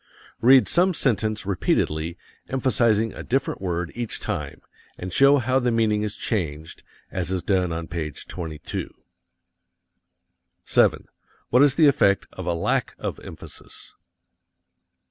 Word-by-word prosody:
Read 130 +2 +6
some 180 +1 +3
sentence 110 -6 0
repeatedly, 85 -4 -1 0.3
emphasizing 115 -4 +1
a - - -8
different 130 -4 -1
word 90 -2 -2
each 120 -2 -4
time, - - -4 0.4
and 90 0 -6
show 140 +1 +6
how 130 +1 +1
the 125 -1 0
meaning 110 -2 +1
is 105 -1 -3
changed, 80 -8 -4 0.3
as 90 -3 -3
is 95 -2 -2
done 90 -3 +1
on 80 0 -4
page 80 -4 -5
22. 80 -4 -6 1.7
7. - - +2 0.4
What 125 - +5
is 145 -1 +5
the 160 - +5
effect 115 -9 +3
of 95 -1 -7
a 85 - +1
lack 85 - -1
of - - -5
emphasis? - - -12
105 Hz, 130 wpm, -24 LUFS, 85-125 Hz, 1.7 s, Read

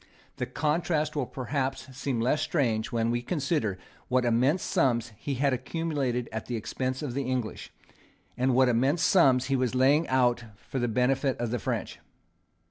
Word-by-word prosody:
The - - -2
contrast 155 0 0
will 140 -4 -1
perhaps 130 0 -3
seem 135 -2 -2
less 130 +6 +1
strange 120 -10 0
when 115 0 +1
we 120 0 0
consider 140 - -1 0.3
what 125 -1 +2
immense 130 +9 +2
sums 120 -3 +1
he 135 +6 -4
had 135 +1 +1
accumulated 130 -2 -2
at 110 -1 -5
the 120 - -3
expense 130 +4 -3
of 135 -5 -3
the 140 +1 -2
English, 125 -4 -3 0.6
and 130 0 +1
what 130 0 +5
immense 130 +8 +2
sums 135 -9 +4
he 135 +1 0
was 130 -1 0
laying 140 +5 +4
out 125 -2 +2
for 130 +6 -6
the 120 - 0
benefit 130 +3 +1
of 120 -2 -2
the 125 - -1
French. - - -3
130 Hz, 170 wpm, -28 LUFS, 120-140 Hz, 0.6 s, what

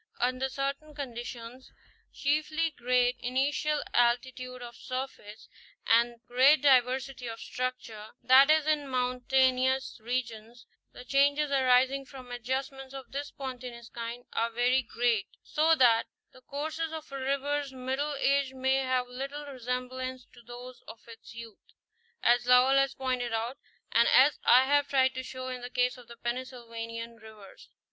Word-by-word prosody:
Under 255 +2 0
certain 280 +3 -4
conditions, 245 -2 -7 0.4
chiefly 310 +3 0
great 250 0 +1
initial 285 +4 0
altitude 250 +1 0
of 240 -1 -9
surface, 255 -5 -7 0.4
and 235 +1 +3
great 270 +5 +4
diversity 260 -1 +2
of 225 0 -6
structure, 250 -5 -5 0.2
that 265 +3 +7
is, 310 -1 +4
in 305 -2 +1
mountainous 255 +1 +1
regions, 235 -1 -4 0.3
the 250 - -12
changes 285 +2 +2
arising 265 0 +3
from 255 -2 -11
adjustments 265 +2 -4
of 270 -1 -9
this 285 +1 -4
spontaneous 250 -4 -8
kind 235 +1 -7
are 230 - 0
very 245 +3 +2
great, 235 -3 0 0.2
so 320 +2 +3
that 235 -5 +4 0.3
the 255 - -17
courses 310 +4 -4
of 315 -2 -8
a 275 - -5
river's 280 +1 -1
middle 265 +3 -3
age 275 -1 +1
may 265 +1 +1
have 255 -1 0
little 275 +4 -6
resemblance 255 -1 -5
to - - -16
those 245 +2 -11
of 225 0 -12
its 230 0 -13
youth, 230 -2 -10 0.6
as 240 0 +4
Léwl 250 +2 +5
has 275 0 +2
pointed 255 -3 -2
out 230 +4 -3 0.3
and 235 +1 +4
as 280 +3 +5
I 255 +2 +7
have 285 +1 +2
tried 260 -1 +3
to 260 - -4
show 255 0 -7
in 250 -1 -5
the 245 - -6
case 250 0 +1
of 250 -2 -15
the 235 - -12
Pennsylvanian 235 -2 -6
rivers. 220 -3 -15
255 Hz, 145 wpm, -29 LUFS, 240-275 Hz, 0.6 s, that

